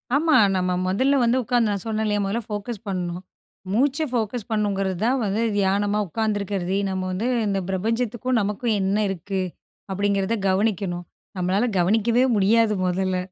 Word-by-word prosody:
ஆமா. 315 +2 +3 0.2
நம்ம 180 0 0 0.2
மொதல்ல 265 +9 +2
வந்து 235 +2 +3
உட்காந்து 240 -2 +2
நான் 200 -2 -3
சொன்னே 220 -1 -1
இல்லையா, 210 -1 +1
மொதல்ல 210 +5 -1
ஃபோக்கஸ் 210 +1 -4
பண்ணும். 180 -2 -3 0.5
மூச்ச 270 +5 +2
ஃபோக்கஸ் 235 -2 -2
பண்ணணுங்கிறது 195 -3 0
தான் 255 +3 +2
வந்து 205 +2 0
தியானமா 205 +1 +1
உட்காந்துருக்கறது. 200 -2 -1
நம்ம 190 0 -2
வந்து 200 +6 -2 0.2
இந்த 195 -1 0
பிரபஞ்சத்துக்கும், 230 +5 -1
நமக்கும் 210 +3 -1
என்ன 195 +2 +1
இருக்கு 195 +1 -3 0.5
அப்டிங்கிறத 200 +2 0
கவனிக்கணும். 190 -3 0 0.3
நம்மளால 185 +5 +1
கவனிக்கவே 225 +7 +3
முடியாது 215 +2 +3
முதல்ல 185 +1 0
205 Hz, 140 wpm, -23 LUFS, 190-230 Hz, 0.5 s, ஆமா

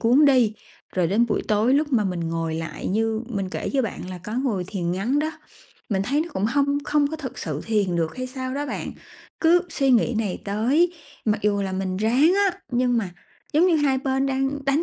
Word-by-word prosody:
cuốn 250 +6 +5
đi. 255 -6 +5 0.4
Rồi 180 -2 +2
đến 215 +7 +2
buổi 220 - -1
tối 215 +5 +3
lúc 290 0 +1
mà 220 -4 +3
mình 180 -3 -2
ngồi 165 -1 -2
lại 160 -1 -5
như 220 +2 0
mình 195 -5 -3
kể - - -3
cho 270 -1 +2
bạn 210 -5 -5
là 180 - -6
có 185 +5 -8
ngồi 235 -8 0
thiền 180 -3 -2
ngắn 225 +10 0
đó, 310 +1 0 0.6
mình 195 -3 0
thấy 275 +9 +1
nó 335 - -2
cũng 190 - -1
hông 280 +5 +2
không 295 -1 +2
có 315 +2 -4
thực 275 -5 -7
sự 155 -2 -3
thiền 200 -6 +1
được 165 +3 -1
hay 255 0 -3
sao 255 0 -5
đó 290 +1 -2
bạn. - - -4 0.5
Cứ 345 +2 +5
suy 275 -4 +1
nghĩ 240 -1 +3
này 210 -5 -2
tới 255 - +2 0.3
mặc 215 -1 +1
dù 205 -1 +2
là 190 -1 -3
mình 185 0 -2
ráng 245 - +4 0.2
á, 375 - -13
nhưng 245 0 +2
mà 200 -5 -2 0.4
giống 320 +5 +5
như 345 -3 +4
hai 280 -3 +2
bên 265 0 0
đang 270 +1 -1
đánh 275 +4 +2
235 Hz, 225 wpm, -24 LUFS, 195-280 Hz, 0.6 s, cuốn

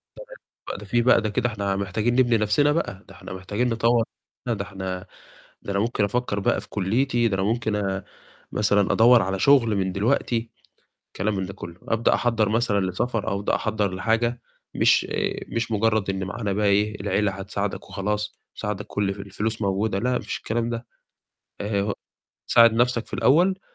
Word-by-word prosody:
تمام، - - -10 0.4
بقى - - -4
ده - - -9
في 120 0 +1
بقى 120 -1 +5
ده 110 - -2
كده 115 +3 0
إحنا 100 -3 -2
محتاجين 105 +5 -1
نبني 120 -2 +4
َنفسنا 125 +8 +3
بقى، 105 - -3
ده 100 - -13
إحنا 95 -1 -10
محتاجين 105 +6 -2
نطوَّر 115 0 +2 0.4
نَفسنا، 120 - +1
ده 100 - -2
إحنا 95 -1 -5 0.6
ده 100 - -4
أنا 100 - 0
ممكن 110 -1 +1
أفكر 105 -1 -1
بقى - - +1
في - - -14
كُلِّيتي، 120 +4 +1
ده 100 - -1
أنا 95 - 0
ممكن 105 -3 -1 0.5
مثلًا 105 -2 +2
أدوّر 120 +1 +6
على 95 +1 -2
شُغل 115 -2 +4
من 95 -1 0
دلوقتي، 115 +2 0 0.7
كلام 105 +2 0
من 95 -1 -2
ده 95 - -8
كُلّه، 85 -2 -10
أبدأ 115 +1 +2
أحضّر 115 -3 +1
مثلًا 110 -2 +1
لسفر 115 +3 -2
أو 100 -2 0
أبدأ 105 - 0
أحضّر 105 -3 -1
لحاجة، 115 +5 0 0.3
مش - - +4
آآ - - -1
مش 115 0 -2
مُجرد 110 -1 +1
إن 95 0 -2
معانا 105 +1 -3
بقى 105 +1 +1
إيه 105 +1 +2
العيلة 100 0 0
هتساعدك 100 +1 -4
وخلاص، 105 +1 -2 0.2
تساعدك 105 -1 -4
كُلّ 100 -1 -1
في 100 - -11
الفلوس 110 +2 -3
موجودة، 100 +1 0
لأ 125 +5 0
ما - - +1
فيش - - -4
الكلام 115 +1 -2
ده، 115 0 -5 0.7
آآ 100 -1 0
ه 100 +1 -1 0.6
ساعد 115 -1 +6
نَفسك 120 0 +1
في - - -17
الأول، 180 +8 +3
105 Hz, 185 wpm, -24 LUFS, 100-115 Hz, 0.7 s, أدوّر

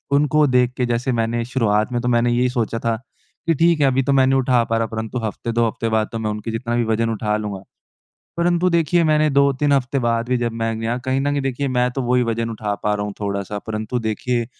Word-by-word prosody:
उनको 150 +1 +3
देख 125 -1 +2
के, 125 - +1
जैसे 120 +2 -1
मैंने 115 0 0
शुरुआत 110 -3 +1
में 120 - 0
तो 125 -1 +1
यही 125 +1 +2
सोचा 115 -2 -2
था 115 -1 0 0.5
कि 165 - +4
ठीक 165 +1 +3
है, - - +5
अभी 135 0 +2
तो 140 - +1
मैं 135 -1 +5
नहीं 135 0 +3
उठा 125 -2 +3
पा 115 -1 0
रहा, 115 0 0
परंतु 110 +2 -4
हफ़्ते, 115 +2 -4
2 115 0 +2
हफ़्ते 115 +1 -3
बाद 110 -1 +1
तो 115 - -4
मैं 110 -1 -2
उनके 105 +2 -5
जितना 115 +1 -2
भी 120 - +2
वज़न 115 +1 0
उठा 105 -1 -1
लूँगा। 100 -2 -5 0.7
परंतु 175 +1 +2
देखिए, 170 +1 +2
मैंने 155 0 +3
2-3 140 +1 +2
हफ़्ते 135 0 +1
बाद 115 -1 0
भी, 125 - +2
जब 120 -1 -1
मैं 115 +1 -2
कहीं 130 +1 0
न 145 +1 0
कहीं 145 0 0
देखिए, 135 +1 -2
मैं 125 0 +1
तो 135 - -2
वही 125 0 +2
वज़न 115 0 -1
उठा 105 -2 -3
पा 105 0 +1
रहा 105 0 -2
हूँ 105 - -5
थोड़ा-सा, 100 0 -3
परंतु 110 +2 -3
देखिए, 115 +2 -1
120 Hz, 240 wpm, -20 LUFS, 115-135 Hz, 0.7 s, है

